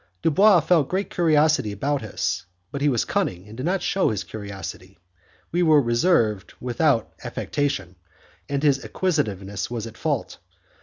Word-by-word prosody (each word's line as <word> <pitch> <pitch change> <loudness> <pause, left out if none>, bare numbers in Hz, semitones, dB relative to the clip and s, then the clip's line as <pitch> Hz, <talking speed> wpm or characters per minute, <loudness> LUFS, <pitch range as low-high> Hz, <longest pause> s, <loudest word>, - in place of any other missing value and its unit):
Dubois 190 +3 +5
felt 160 -3 +2
great 190 +2 -2
curiosity 155 -8 +3
about 140 +8 -1
us, 95 -3 -3 0.2
but 140 - -5
he 145 - +3
was 120 -4 +1
cunning 90 +2 -2
and 105 - -11
did 130 +6 -3
not 190 +1 0
shew 195 - +2
his 105 -2 -2
curiosity; 100 -2 -8 0.5
we 175 - +1
were 155 -3 +6
reserved 120 - +1
without 125 0 +1
affectation, 100 - -2 0.5
and 140 0 -1
his 140 -2 +3
inquisitiveness 100 - -2
was 115 -2 -4
at 115 -1 -10
fault. - - -2
135 Hz, 150 wpm, -24 LUFS, 105-160 Hz, 0.5 s, were